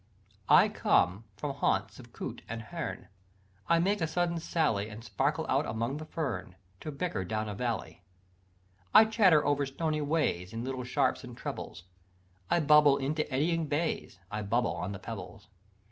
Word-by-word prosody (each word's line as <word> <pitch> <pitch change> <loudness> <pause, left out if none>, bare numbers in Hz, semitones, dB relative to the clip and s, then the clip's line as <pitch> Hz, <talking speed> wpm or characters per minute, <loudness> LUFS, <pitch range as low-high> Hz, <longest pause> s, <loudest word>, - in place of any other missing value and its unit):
"I - - +8
come 95 +6 +2
from 140 +4 -3
haunts - - 0
of - - -13
coot - - -6
and 115 0 -4
hern, 170 +5 -5 0.6
I 170 - +5
make 195 +3 +1
a 160 - +1
sudden 170 +1 0
sally, 145 -12 0
And 110 +1 -9
sparkle 115 - -1
out - - +1
among 115 +5 -2
the 155 0 -8
fern, 110 - -4 0.2
To 155 - -6
bicker 140 - -2
down 110 +4 -2
a 105 - -4
valley. 115 -3 -3 0.9
"I 220 - +10
chatter 195 -9 +4
over 145 0 +2
stony 155 +2 -1
ways, 145 - 0
In 115 +1 -4
little 130 0 -3
sharps 125 - 0
and - - -10
trebles, - - -6 0.7
I 175 - +3
bubble 150 -2 +6
into 150 +3 -2
eddying 160 +4 +1
bays, 150 - -2
I 105 - -2
bubble 115 +4 0
on 90 - -4
the 100 - -5
pebbles. - - -8
140 Hz, 165 wpm, -30 LUFS, 110-160 Hz, 0.9 s, I